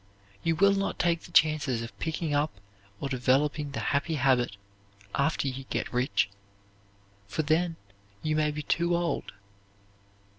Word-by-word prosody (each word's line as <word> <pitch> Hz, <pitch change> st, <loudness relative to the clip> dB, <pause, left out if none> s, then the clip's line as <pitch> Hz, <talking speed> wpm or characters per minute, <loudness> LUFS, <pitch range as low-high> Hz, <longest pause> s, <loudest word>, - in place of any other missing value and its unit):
You 165 Hz, -1 st, +1 dB
will 200 Hz, +4 st, +5 dB
not 195 Hz, 0 st, -1 dB
take 170 Hz, -1 st, +2 dB
the -, -, -13 dB
chances 150 Hz, -8 st, +3 dB
of 115 Hz, -, -8 dB
picking 160 Hz, -1 st, -2 dB
up 145 Hz, -7 st, 0 dB, 0.4 s
or 140 Hz, -, -2 dB
developing 140 Hz, +3 st, +1 dB
the 140 Hz, -, -4 dB
happy 150 Hz, +3 st, +1 dB
habit 125 Hz, -6 st, +2 dB, 0.6 s
after 140 Hz, -1 st, +1 dB
you 135 Hz, 0 st, -4 dB
get -, -, -3 dB
rich, 125 Hz, -2 st, +2 dB, 1.0 s
for 155 Hz, +10 st, -1 dB
then 165 Hz, +3 st, +1 dB, 0.5 s
you 155 Hz, 0 st, +1 dB
may 155 Hz, 0 st, +2 dB
be 150 Hz, 0 st, -4 dB
too 170 Hz, +3 st, +1 dB
old. 170 Hz, -1 st, -1 dB
150 Hz, 145 wpm, -28 LUFS, 135-165 Hz, 1.0 s, will